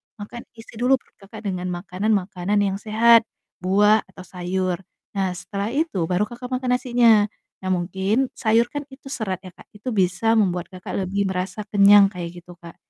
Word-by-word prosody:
Makan 220 +3 -8
isi 225 - -13
dulu 250 +2 +4
perut 260 - -14
Kakak 220 +1 -10
dengan 185 -2 -3
makanan-makanan 195 +1 -1
yang 195 -1 -1
sehat 225 +1 +5 0.3
buah 205 +4 +4
atau 190 -1 -12
sayur. 180 0 -2 0.4
Nah, 190 -2 0
setelah 200 +3 -4
itu 280 - 0
baru 180 +3 +1
Kakak 240 +2 -8
makan 255 -1 +1
nasinya. 235 -4 +4 0.4
Nah, 185 - -2
mungkin 190 +8 0
sayur 230 0 +2
kan 290 0 -4
itu 265 - -14
serat 195 -9 -3
ya 185 - -10
Kak, - - -17
itu 210 +5 -6
bisa 195 +2 +1
membuat 180 -3 0
Kakak 185 0 -8
lebih 200 +1 0
merasa 185 +3 -3
kenyang 200 0 +7
kayak 175 -2 -5
gitu, 175 -1 -13
Kak. 170 -1 -12
200 Hz, 170 wpm, -23 LUFS, 185-225 Hz, 0.4 s, kenyang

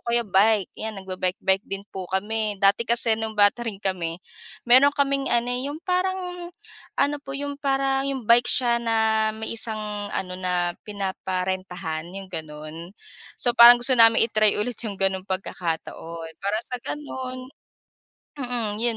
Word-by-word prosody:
kaya 235 0 +2
bike 205 0 +3
'yan 220 0 -4
nagba-bike-bike 190 +1 -1
din 195 0 -5
po 185 -2 -6
kami. 210 +2 -1
Dati 195 +3 +4
kasi 235 -1 +3
nung 220 -1 -4
bata 205 +3 +5
rin 215 -3 -3
kami 175 -4 -2 0.5
meron 260 +4 +7
kaming 275 -1 0
ano, 235 0 +2
yung 275 +5 -3
parang 365 -1 -2 0.5
ano, 285 +1 +2
po 270 - -8
yung 285 0 -4
parang 270 -1 +1
yung 265 -3 -3
bike 240 +1 +6
siya 240 -2 +2
na 220 -1 +2
may 220 0 -4
isang 220 -1 0 0.3
ano 180 -1 -3
na 180 -1 0 0.2
pinaparentahan 185 -4 -3
yung 195 -1 -8
gano'n. 155 +2 -8 0.4
So, 245 - +1
parang 240 +1 +10
gusto 260 +2 +2
namin 225 -1 +6
i-try 215 -2 +2
ulit 220 +2 -2
yung 200 - -6
gano'ng 190 0 0
pagkakataon 165 -3 -4
para 200 +2 0
sa 250 - -4
gano'n, 260 -2 -5 1.0
mm, 245 -4 -2
'yon 235 -1 +3
220 Hz, 150 wpm, -24 LUFS, 190-245 Hz, 1.0 s, parang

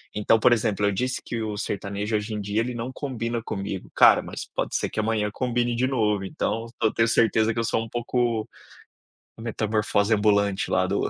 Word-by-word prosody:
Então 105 +2 +3
por 120 - +5
exemplo, 105 -3 0
eu 100 - +3
disse 125 +6 -2
que 115 -1 -3
o 105 -1 -3
sertanejo 100 +2 -3
hoje 105 +1 -2
em - - -3
dia 100 +2 -1
ele 125 +1 -3
não 120 +3 -4
combina 120 -4 -3
comigo. 95 -1 -5
Cara, - - +7
mas - - -7
pode - - -2
ser - - 0
que - - -4
amanhã 105 -1 0
combine 120 -1 0
de 125 +2 +1
novo 105 -6 +1
então, 115 +4 -2 0.2
eu 110 - +3
tenho 115 0 +2
certeza 115 -1 +3
que 115 - -3
eu - - +1
sou 115 0 0
um 115 - -9
pouco, 120 -2 -1 0.9
metamorfose 110 -1 0
ambulante 100 -2 +2
lá - - +2
do - - 0
110 Hz, 200 wpm, -25 LUFS, 105-115 Hz, 0.9 s, Cara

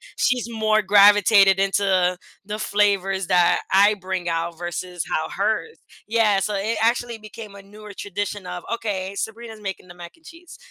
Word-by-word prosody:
she's 245 -2 0
more 215 -1 +1
gravitated 200 -1 +5
into 190 -2 +1 0.3
the 210 +1 -5
flavors 195 -3 0
that 175 -1 +3
I 200 +2 +5
bring 185 -3 -5
out 165 0 -3
versus 175 0 -5
how 155 - -1
hers 220 - -2 0.3
yeah, 215 -3 +2
so 200 +1 -2
it 215 +4 -2
actually 235 0 0
became 215 -1 -11
a 200 - -11
newer 210 +1 -13
tradition 205 0 -5
of, 180 -1 -6
"Okay, 200 -4 -4
Sabrina's 220 +1 -6
making 195 -2 -6
the - - -10
mac 175 -1 -11
and 325 - -29
cheese." 335 +1 -14
200 Hz, 165 wpm, -22 LUFS, 185-215 Hz, 0.3 s, gravitated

